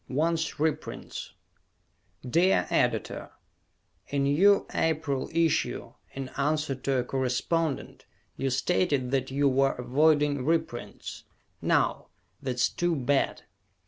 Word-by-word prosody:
_ 130 Hz, -, -5 dB
Wants 160 Hz, +1 st, 0 dB
Reprints 155 Hz, 0 st, -3 dB, 0.9 s
Dear 175 Hz, +9 st, +3 dB
Editor: -, -, 0 dB, 0.8 s
In 140 Hz, -1 st, 0 dB
you 190 Hz, +9 st, +4 dB
April 155 Hz, -4 st, 0 dB
issue, 165 Hz, -1 st, 0 dB, 0.2 s
in 135 Hz, -1 st, -5 dB
answer 150 Hz, +1 st, 0 dB
to 135 Hz, +1 st, -1 dB
a 125 Hz, -, +1 dB
correspondent, 135 Hz, +5 st, -1 dB, 0.3 s
you 135 Hz, -, -1 dB
stated 135 Hz, -1 st, +1 dB
that 135 Hz, -1 st, 0 dB
you 140 Hz, +2 st, +2 dB
were 135 Hz, 0 st, +3 dB
avoiding 145 Hz, +2 st, +2 dB
reprints. 160 Hz, -5 st, -3 dB, 0.4 s
Now, -, -, +1 dB, 0.3 s
that's 125 Hz, -2 st, +1 dB
too 175 Hz, -1 st, 0 dB
bad. 140 Hz, 0 st, 0 dB
140 Hz, 110 wpm, -28 LUFS, 130-160 Hz, 0.9 s, you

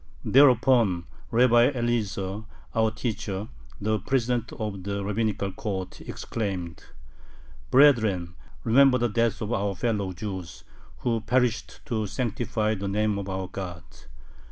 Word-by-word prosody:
Thereupon 120 Hz, -9 st, +4 dB, 0.2 s
Rabbi 120 Hz, +1 st, +5 dB
Eliezer, 110 Hz, -4 st, -2 dB, 0.3 s
our 110 Hz, 0 st, +3 dB
teacher, 105 Hz, -2 st, -4 dB, 0.3 s
the 110 Hz, +1 st, 0 dB
president 120 Hz, +1 st, 0 dB
of 105 Hz, -5 st, -4 dB
the 100 Hz, +1 st, -3 dB
[rabbinical] 105 Hz, -1 st, -1 dB
court, 95 Hz, -2 st, -5 dB
exclaimed: 95 Hz, -7 st, -5 dB, 0.8 s
"Brethren, 110 Hz, -11 st, +4 dB, 0.3 s
remember 130 Hz, +3 st, +5 dB
the 120 Hz, -1 st, +1 dB
death 115 Hz, +1 st, 0 dB
of 105 Hz, +3 st, -2 dB
our 100 Hz, -2 st, -1 dB
fellow 105 Hz, -2 st, -1 dB
Jews, 95 Hz, -2 st, -6 dB, 0.4 s
who 115 Hz, -2 st, 0 dB
perished 125 Hz, +1 st, 0 dB
to 110 Hz, -3 st, -2 dB
sanctify 110 Hz, -1 st, -1 dB
the 100 Hz, -1 st, -4 dB
name 105 Hz, +1 st, 0 dB
of 100 Hz, 0 st, -5 dB
our 95 Hz, -1 st, -3 dB
God! 90 Hz, -3 st, -6 dB
110 Hz, 120 wpm, -26 LUFS, 100-120 Hz, 0.8 s, Rabbi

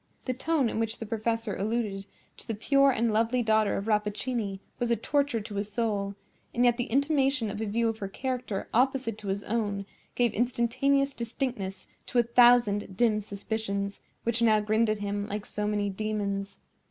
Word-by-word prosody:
The 255 Hz, -, 0 dB
tone 285 Hz, +1 st, +1 dB
in 225 Hz, -, -2 dB
which 225 Hz, 0 st, -1 dB
the 225 Hz, -, -6 dB
professor 225 Hz, 0 st, -1 dB
alluded 205 Hz, -2 st, -2 dB, 0.3 s
to -, -, -11 dB
the 225 Hz, -, -2 dB
pure 275 Hz, +6 st, +4 dB
and 230 Hz, -3 st, +1 dB
lovely 230 Hz, +3 st, +2 dB
daughter 220 Hz, -1 st, +2 dB
of 200 Hz, -, -3 dB
Rappaccini 210 Hz, -1 st, -1 dB, 0.2 s
was 240 Hz, -, 0 dB
a 235 Hz, -, +4 dB
torture 275 Hz, +1 st, 0 dB
to 210 Hz, 0 st, -8 dB
his 205 Hz, +1 st, -2 dB
soul; 205 Hz, -3 st, -1 dB, 0.4 s
and 245 Hz, +1 st, +3 dB
yet 240 Hz, -1 st, +4 dB
the 245 Hz, -, -1 dB
intimation 275 Hz, -3 st, +2 dB
of 210 Hz, -, -5 dB
a 220 Hz, -, -1 dB
view 230 Hz, +3 st, +1 dB
of 225 Hz, -1 st, -2 dB
her 195 Hz, -, -3 dB
character 250 Hz, -1 st, -3 dB
opposite 255 Hz, -3 st, +1 dB
to 205 Hz, -, -8 dB
his 195 Hz, +1 st, -1 dB
own, 205 Hz, -3 st, -1 dB, 0.3 s
gave 240 Hz, -2 st, +2 dB
instantaneous 255 Hz, +4 st, +1 dB
distinctness 235 Hz, -5 st, -4 dB, 0.2 s
to -, -, -2 dB
a 240 Hz, -, +6 dB
thousand 235 Hz, -5 st, +4 dB
dim 220 Hz, -2 st, +3 dB
suspicions, 200 Hz, -1 st, -3 dB, 0.2 s
which 235 Hz, 0 st, 0 dB
now 220 Hz, -2 st, +5 dB
grinned 215 Hz, +2 st, +2 dB
at 215 Hz, -, +1 dB
him 205 Hz, 0 st, -3 dB
like 210 Hz, 0 st, -4 dB
so 210 Hz, 0 st, -2 dB
many 205 Hz, -1 st, 0 dB
demons. 200 Hz, -1 st, -3 dB
225 Hz, 185 wpm, -28 LUFS, 205-240 Hz, 0.4 s, a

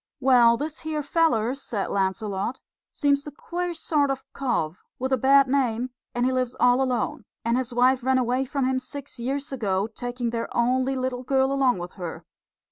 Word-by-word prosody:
"Well, 245 Hz, -3 st, +5 dB
this 300 Hz, +3 st, -4 dB
here 310 Hz, -2 st, -3 dB
feller," 275 Hz, -7 st, +2 dB
said 235 Hz, -7 st, -4 dB
Lancelot, 200 Hz, +4 st, -1 dB, 0.3 s
"seems 285 Hz, 0 st, +1 dB
a -, -, -5 dB
queer 350 Hz, +4 st, -4 dB
sort 300 Hz, -3 st, +1 dB
of 270 Hz, -1 st, -2 dB
cove, 205 Hz, -, -1 dB, 0.2 s
with 260 Hz, +1 st, -1 dB
a -, -, +6 dB
bad 275 Hz, +2 st, +5 dB
name, 255 Hz, -2 st, 0 dB, 0.2 s
and 245 Hz, 0 st, +1 dB
he 260 Hz, -, +2 dB
lives 255 Hz, -1 st, -1 dB
all 245 Hz, +1 st, +4 dB
alone; 255 Hz, -2 st, -1 dB, 0.2 s
and 230 Hz, +1 st, +2 dB
his 255 Hz, -1 st, -1 dB
wife 250 Hz, +2 st, +3 dB
ran 260 Hz, +1 st, +3 dB
away 255 Hz, +1 st, +1 dB
from 275 Hz, 0 st, -1 dB
him 260 Hz, 0 st, +1 dB
six 275 Hz, 0 st, -8 dB
years 275 Hz, +4 st, -3 dB
ago, 200 Hz, -7 st, 0 dB
taking 245 Hz, +1 st, -4 dB
their 230 Hz, -1 st, -2 dB
only 255 Hz, +3 st, +2 dB
little 255 Hz, -1 st, -2 dB
girl 265 Hz, +1 st, +2 dB
along 270 Hz, -4 st, +2 dB
with 175 Hz, 0 st, -6 dB
her. 170 Hz, -2 st, -6 dB
255 Hz, 185 wpm, -25 LUFS, 235-275 Hz, 0.3 s, a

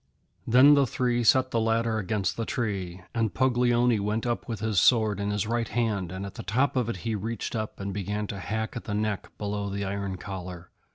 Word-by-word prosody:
Then 130 Hz, +5 st, +7 dB
the 140 Hz, -2 st, +4 dB
three 120 Hz, 0 st, 0 dB
set 130 Hz, +3 st, +4 dB
the 115 Hz, -, +1 dB
ladder 115 Hz, 0 st, +1 dB
against 100 Hz, -1 st, -1 dB
the 115 Hz, -, -2 dB
tree, 95 Hz, -7 st, -3 dB
and 115 Hz, -5 st, 0 dB
Puglioni 120 Hz, -3 st, +3 dB
went 105 Hz, +3 st, -1 dB
up 120 Hz, -1 st, -2 dB
with 110 Hz, -3 st, -3 dB
his 110 Hz, -3 st, +1 dB
sword 110 Hz, -1 st, +4 dB
in 100 Hz, 0 st, -1 dB
his 105 Hz, -1 st, 0 dB
right 115 Hz, +1 st, -1 dB
hand, 105 Hz, -6 st, -1 dB
and 95 Hz, +1 st, -5 dB
at 100 Hz, -, -7 dB
the -, -, -7 dB
top 130 Hz, +7 st, +1 dB
of 125 Hz, -3 st, +1 dB
it 115 Hz, -, -3 dB
he 115 Hz, -, 0 dB
reached 110 Hz, +4 st, -3 dB
up 110 Hz, -1 st, -4 dB
and 100 Hz, 0 st, -4 dB
began 105 Hz, +2 st, -2 dB
to 100 Hz, -1 st, -6 dB
hack 110 Hz, +5 st, -3 dB
at 120 Hz, -, -6 dB
the 105 Hz, -, -3 dB
neck 105 Hz, -1 st, -2 dB
below 105 Hz, 0 st, -3 dB
the 100 Hz, 0 st, -3 dB
iron 100 Hz, -1 st, -3 dB
collar. 90 Hz, -2 st, -7 dB
110 Hz, 220 wpm, -27 LUFS, 100-115 Hz, -, Then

